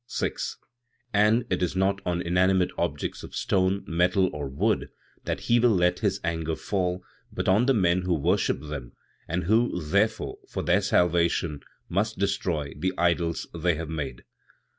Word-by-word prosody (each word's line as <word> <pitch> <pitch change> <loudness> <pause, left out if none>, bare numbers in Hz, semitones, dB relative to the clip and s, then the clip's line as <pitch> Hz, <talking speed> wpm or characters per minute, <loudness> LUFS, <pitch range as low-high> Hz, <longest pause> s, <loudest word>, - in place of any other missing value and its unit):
6. - - -3 0.6
"And 105 +3 +4
it 90 - 0
is 90 0 0
not 100 +1 +1
on 90 0 0
inanimate 90 +1 +2
objects 75 -4 -2
of - - -10
stone, 95 0 +1
metal 90 +2 +2
or 75 -1 -4
wood 65 - 0 0.4
that - - -2
He 120 +1 +3
will 120 +1 +5
let 90 0 +2
His 100 -3 0
anger 80 -1 -1
fall, 90 -1 -2 0.3
but - - -3
on 105 +7 +4
the 135 - +4
men 90 -3 +3
who 90 -1 0
worship 90 +6 +1
them, 75 -5 -7 0.3
and 90 +3 -1
who, 110 +1 +2
therefore, 100 +7 0
for - - -3
their - - +3
salvation, 85 -3 +2 0.3
must 105 +5 -1
destroy 90 -7 -1
the 95 +6 -1
idols 85 -1 +1
they 85 0 +1
have 80 0 -5
made. 70 -6 -5
90 Hz, 160 wpm, -26 LUFS, 85-100 Hz, 0.6 s, will